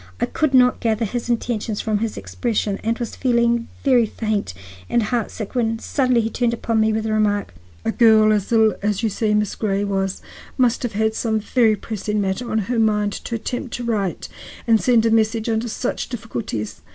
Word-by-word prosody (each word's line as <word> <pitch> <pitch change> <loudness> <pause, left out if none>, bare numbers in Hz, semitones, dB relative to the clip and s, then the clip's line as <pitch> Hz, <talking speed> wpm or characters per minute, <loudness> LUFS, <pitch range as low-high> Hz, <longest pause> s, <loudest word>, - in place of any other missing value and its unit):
I - - +2
could 310 -4 0
not 250 -1 +5
gather 225 0 0
his 240 +3 -4
intentions 225 -2 -1
from 215 -2 0
his 225 0 -3
expression, 215 -4 -2
and 230 +1 0
was 235 -2 -5
feeling 235 -2 +1 0.2
very 250 -5 +4
faint 215 - -2 0.3
and 235 - +2
heart 230 0 -1
sick 215 -3 -7
when 230 -3 +1
he - - -8
suddenly 250 -3 +1
turned 235 0 0
upon 230 -1 -1
me 220 0 +3
with 220 0 -1
the 220 0 -1
remark: 205 - 0 0.3
"A 225 - +1
girl 220 -2 +5
as 205 0 -1
ill 220 -2 +4
as 205 +1 -1
you 225 - +2
say 210 +1 0
Miss 210 -1 0
Grey 200 -2 -1
was 195 -1 -2 0.3
must 245 -3 +2
have 245 -3 -3
had 220 +1 +1
some 220 -1 0
very 220 0 +2
pressing 210 0 -3
matter 195 +4 -2
on 220 - 0
her 240 +2 -1
mind 210 -2 +2
to 235 - -5
attempt 245 +2 -4
to 245 - -5
write 210 -6 -2 0.4
and 225 -2 +4
send 235 -3 +3
a 225 - +3
message 225 0 +2
under 225 +1 -1
such 240 +3 -3
difficulties. 220 - -5
220 Hz, 200 wpm, -21 LUFS, 210-235 Hz, 0.4 s, not